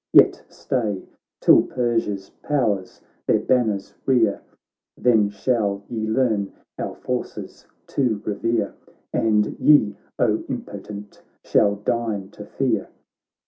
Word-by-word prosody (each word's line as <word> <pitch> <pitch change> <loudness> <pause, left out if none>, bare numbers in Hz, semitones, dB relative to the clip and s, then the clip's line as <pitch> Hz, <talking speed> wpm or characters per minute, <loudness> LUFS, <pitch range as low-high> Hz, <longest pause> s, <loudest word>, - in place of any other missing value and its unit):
"Yet - - +6
stay, 105 -7 -2 0.4
till - - +7
Persia's 115 -6 -1
powers 105 -10 -1 0.3
their - - +5
ban 125 -2 +2
ners 100 -2 -3
rear, 120 -6 +3 0.6
Then 110 -4 +4
shall 100 -1 0
ye 110 -2 -2
learn 110 -4 +1 0.3
our - - -3
forces - - -5 0.2
to 120 -7 0
revere, 115 +3 0 0.4
.And 105 -2 +2
ye, 110 -9 +5 0.2
O - - +2
impotent, 105 0 -7 0.2
shall 100 0 +3
deign 105 -2 -2
to 105 0 -10
fear! 120 -7 -1
110 Hz, 110 wpm, -23 LUFS, 100-120 Hz, 0.6 s, till